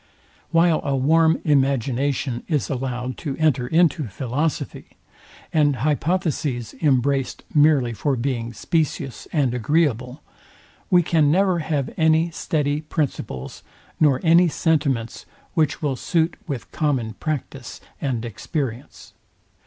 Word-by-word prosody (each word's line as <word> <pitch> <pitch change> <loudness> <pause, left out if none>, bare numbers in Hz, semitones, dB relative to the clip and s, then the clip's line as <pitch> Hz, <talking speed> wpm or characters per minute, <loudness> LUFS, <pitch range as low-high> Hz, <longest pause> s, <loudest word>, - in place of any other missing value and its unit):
While 165 -1 +3
a 140 -2 0
warm 160 +4 +3
imagination 135 -2 +1
is 150 -5 -1
allowed 125 -1 -3
to 145 -5 -4
enter 140 -6 +2
into 160 -2 +2
philosophy, 130 +8 -3 0.6
and 145 -3 +3
hypotheses 150 - -1
embraced 135 -2 +1
merely 145 -5 +4
for 140 +5 0
being 120 -2 -2
specious 140 +1 -2
and 140 -7 +1
agreeable, 125 0 0 0.7
we 180 -3 +5
can 160 -3 +3
never 185 +2 +3
have 150 -4 -2
any 160 +1 +3
steady 150 -2 -1
principles, 140 - -4 0.4
nor 145 -4 +4
any 170 +1 +5
sentiments, 145 -8 -1 0.3
which 155 -3 0
will 140 -3 0
suit 165 +5 0
with 140 -6 -5
common 130 -8 -1
practice 135 -4 -5 0.2
and 125 -5 -2
experience. 125 - -5
145 Hz, 115 wpm, -22 LUFS, 125-160 Hz, 0.7 s, we